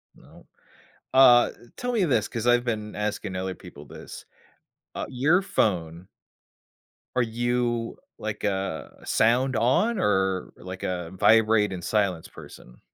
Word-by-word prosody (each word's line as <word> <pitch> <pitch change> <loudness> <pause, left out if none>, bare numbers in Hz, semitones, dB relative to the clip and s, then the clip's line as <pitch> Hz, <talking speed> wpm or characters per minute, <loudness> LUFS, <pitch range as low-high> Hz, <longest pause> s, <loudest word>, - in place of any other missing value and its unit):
No. - - -19 0.7
Uh, 125 -2 +7 0.3
tell 245 0 -3
me 220 -5 +2
this, 120 - +1
'cause 115 0 -4
I've 120 0 +4
been 105 -3 -3
asking 105 -3 -3
other 95 0 -3
people - - -13
this, - - -11 0.7
uh, - - -3
your 150 +9 +2
phone 90 - -1 1.1
Are 125 - +3
you, 120 0 -1 0.2
like, 110 -1 -5
a 95 -5 -3
sound 125 +3 +2
on, 135 - +2
or, 95 -2 0
like, 95 +1 -9
a 90 -2 -3
vibrate 110 0 +3
and 90 -2 -7
silence 100 -6 0
person? - - -14
110 Hz, 130 wpm, -25 LUFS, 95-120 Hz, 1.1 s, Uh